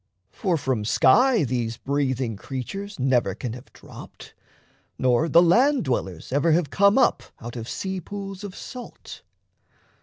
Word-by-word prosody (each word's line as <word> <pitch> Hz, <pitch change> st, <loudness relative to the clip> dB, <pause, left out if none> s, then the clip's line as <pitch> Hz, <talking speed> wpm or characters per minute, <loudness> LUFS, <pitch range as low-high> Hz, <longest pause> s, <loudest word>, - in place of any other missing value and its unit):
For 180 Hz, -4 st, -1 dB
from 130 Hz, -7 st, -1 dB
sky 230 Hz, -, +4 dB
These 120 Hz, -3 st, -2 dB
breathing 130 Hz, -4 st, -1 dB
creatures 190 Hz, -, -6 dB
never 125 Hz, -7 st, +1 dB
can 115 Hz, +1 st, -5 dB
have 125 Hz, +1 st, -12 dB
dropped, -, -, -13 dB, 0.6 s
Nor 130 Hz, +6 st, +2 dB
the 170 Hz, +2 st, +6 dB
land 250 Hz, -, +4 dB
dwellers 95 Hz, -9 st, -3 dB
ever 145 Hz, +4 st, +2 dB
have 165 Hz, -3 st, +1 dB
come 200 Hz, +3 st, +4 dB
up 260 Hz, -, +3 dB, 0.2 s
Out 120 Hz, 0 st, -8 dB
of 115 Hz, -1 st, -6 dB
sea 190 Hz, -1 st, -4 dB
pools 195 Hz, +2 st, -7 dB
of 200 Hz, -2 st, -7 dB
salt. 250 Hz, -2 st, -10 dB
145 Hz, 145 wpm, -24 LUFS, 125-195 Hz, 0.6 s, the